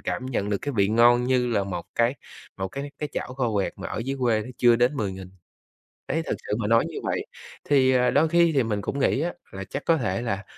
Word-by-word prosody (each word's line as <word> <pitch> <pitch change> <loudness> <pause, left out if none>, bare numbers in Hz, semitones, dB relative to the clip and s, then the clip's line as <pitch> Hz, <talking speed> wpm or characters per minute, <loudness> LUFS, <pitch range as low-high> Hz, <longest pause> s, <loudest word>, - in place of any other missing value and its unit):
cảm 130 - -3
nhận 105 -6 -2
được 100 - +1
cái 145 - -3
vị 100 -1 +3
ngon 120 +2 +5
như 125 -1 +2
là 100 -3 +1
một 90 -3 -5
cái 120 +3 +2 0.4
một 95 0 -3
cái 140 +6 -6
cái 150 - -3
chảo 125 - -4
kho 125 -4 -1
quẹt 100 -2 0
mà - - -6
ở - - -4
dưới 135 +1 -3
quê 115 -3 +2 0.2
chưa 120 -1 +5
đến 125 +4 +2
10.000. 95 -4 -4 0.8
Đấy 165 - 0
thực - - -1
sự 105 - 0
mà 105 - -1
nói 115 +1 +4
như - - -7
vậy, - - -2 0.4
thì, 135 -2 +3
à, 125 -1 +3
đôi 155 +3 +3
khi 170 0 +4
thì 135 - +4
mình 105 -2 -2
cũng 140 - -3
nghĩ 135 0 +2
á 175 +2 -2 0.2
là 95 0 -6
chắc 140 - -5
có 165 - +4
thể 105 -6 -1
là 100 -5 -2
120 Hz, 250 wpm, -25 LUFS, 105-135 Hz, 0.8 s, ngon